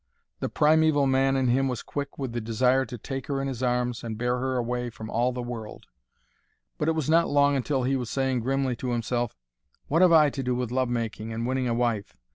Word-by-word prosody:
The - - -2
primeval 155 -1 +3
man 135 0 +2
in 130 -2 +1
him 135 +2 +2
was 125 -3 -3
quick 140 -1 -5
with 135 -3 -3
the 120 - -2
desire 125 +4 +2
to 125 - -7
take 135 +3 -6
her 140 -1 -1
in 135 - -2
his 130 -3 -4
arms 125 -1 0
and 110 -2 -5
bear 125 +2 0
her 130 0 -1
away 120 0 -2
from 110 -1 -9
all 120 +2 +1
the 125 -1 -4
world. 115 -3 -7 0.9
But 150 - 0
it - - +2
was 155 -4 -2
not 165 +2 +4
long 145 0 +3
until 135 0 0
he 135 +2 +1
was 125 -3 -3
saying 130 -2 0
grimly 135 +1 0
to 125 - -4
himself, 120 - -2 0.5
"What 165 +4 +3
have 180 -2 +6
I 155 -3 +6
to 135 - -4
do 125 -1 -1
with 125 -2 -2
love 130 0 0
making 115 -2 -3
and 115 +1 -3
winning 130 0 0
a 115 - 0
wife? 115 -4 -1
125 Hz, 235 wpm, -26 LUFS, 120-135 Hz, 0.9 s, have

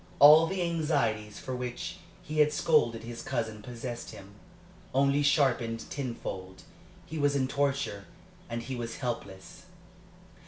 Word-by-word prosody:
All 155 +3 +9
the 190 0 -1
anxieties 115 -11 0
for 130 - -5
which 125 -1 -5 0.3
he 155 +1 -3
had 150 0 +5
scolded 145 -7 +2
his 115 0 -7
cousin 115 -4 -3
possessed 120 +1 -6
him, 100 +1 -11 0.6
only 140 +1 +4
sharpened 125 -6 +2
tenfold; 95 -8 -5 0.4
he 160 +1 -5
was 145 0 +2
in 130 -2 +1
torture, 140 -7 -1 0.4
and 115 0 -3
he 130 - -4
was 115 -1 -4
helpless. 100 -7 -6
125 Hz, 130 wpm, -29 LUFS, 115-145 Hz, 0.6 s, All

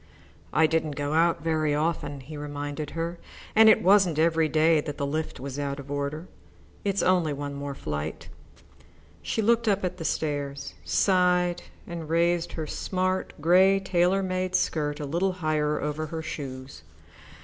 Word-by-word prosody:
"I 160 - +4
didn't 155 -2 0
go 145 +1 -2
out 165 +1 +2
very 155 -2 +1
often," 150 -2 -2
he 150 +4 -10
reminded 145 0 -5
her, 170 +1 -3 0.4
"and 220 0 +8
it - - +5
wasn't 190 -4 +4
every 160 0 +3
day 160 0 +4
that 145 -1 -6
the 140 - -1
lift 155 +3 -3
was 135 +1 -6
out 140 0 -3
of 140 0 -9
order. 145 +4 -3 0.6
It's 200 -1 0
only 180 -5 +2
one 145 0 -5
more 140 0 -5
flight." 75 - -5 0.9
She 220 - -1
looked 230 +1 +2
up 200 -2 +2 0.2
the 165 - -6
stairs, 145 -3 -2
sighed, 180 -2 +2 0.2
and 165 -2 -7
raised 170 +1 +1
her 160 - -4
smart, 185 +4 -2
grey, 185 +5 +5
tailor 190 0 +2
made 185 0 -1
skirt 150 -4 0
a 150 - -3
little 175 +6 0
higher 155 -3 0
over 150 +1 -3
her 160 +1 -5
shoes. 135 -3 -7
160 Hz, 160 wpm, -26 LUFS, 145-180 Hz, 0.9 s, and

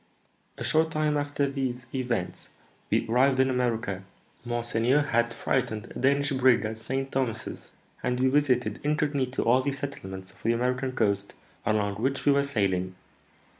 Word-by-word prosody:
"A - - -5
short 160 +1 +3
time 155 -1 0
after 145 -1 0
these 130 -2 -3
events 125 -8 -3 0.4
we - - +1
arrived 130 +3 +3
in 130 0 +4
America. 115 -6 -1 0.4
Monseigneur 120 +3 +1
had 120 -4 +1
freighted 120 -4 -2
a - - -5
Danish 140 +2 +2
brig 130 -3 +4
at 110 +1 -4
St. 135 +4 -3
Thomas's, 115 -4 -3 0.3
and 125 0 -1
we 130 - +3
visited 125 -6 +2
incognito 145 -3 0
all 125 +3 +4
the 140 +2 -1
settlements 115 -10 -6
of - - -21
the 115 - +2
American 125 +2 -1
coast 100 -4 0 0.3
along 105 -2 +1
which 135 +5 -1
we 145 - +6
were 140 0 +4
sailing. 95 -8 0
125 Hz, 155 wpm, -27 LUFS, 115-140 Hz, 0.4 s, we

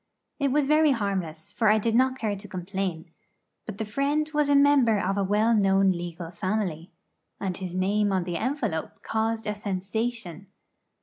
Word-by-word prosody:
It 280 -2 +1
was 290 +1 +2
very 305 0 +4
harmless, 190 -8 -3
for 225 - +1
I 215 - +5
did 225 +1 0
not 260 +2 +3
care 215 -4 -2
to 200 +1 -10
complain; 180 -3 -4 0.6
but 215 -3 -6
the 220 - -3
friend 280 +7 0
was 295 -1 +2
a 285 - +4
member 280 -6 +5
of 195 0 0
a 200 - 0
well 210 +4 +2
known 195 -2 +4
legal 175 -1 -5
family, 185 -2 -2 0.5
and 190 -2 -2
his 180 -1 -6
name 200 +2 +1
on 190 -2 +1
the 175 -1 -3
envelope 225 - -3
caused 225 0 -1
a 210 - -1
sensation. 200 -1 -4
205 Hz, 175 wpm, -26 LUFS, 185-235 Hz, 0.6 s, I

